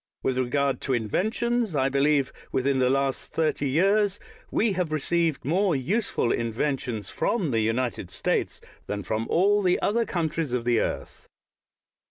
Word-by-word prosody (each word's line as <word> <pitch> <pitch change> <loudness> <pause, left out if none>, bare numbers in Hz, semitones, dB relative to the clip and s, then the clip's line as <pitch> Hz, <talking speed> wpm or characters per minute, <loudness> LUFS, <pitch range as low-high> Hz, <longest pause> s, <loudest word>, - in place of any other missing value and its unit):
With 130 -1 0
regard 135 +2 0
to 135 - -1
inventions, 215 - 0
I 135 -1 +2
believe, 140 0 +2 0.2
within 135 +1 +1
the 125 -1 +3
last 135 0 -1
thirty 155 -3 0
years, 195 +6 +2 0.3
we 220 -1 +1
have 180 -4 -1
received 160 0 0
more 180 +3 +2
useful 160 - 0
inventions 115 -2 -2
from 195 - 0
the 115 -2 +2
United 115 -3 -1
States 95 - -1 0.3
than 105 -1 -3
from 110 +4 -2
all 205 +4 +3
the 180 -2 +2
other 230 +3 +1
countries 165 - -2
of 120 -2 -1
the 120 -2 +3
earth. - - -4
140 Hz, 150 wpm, -26 LUFS, 125-185 Hz, 0.3 s, the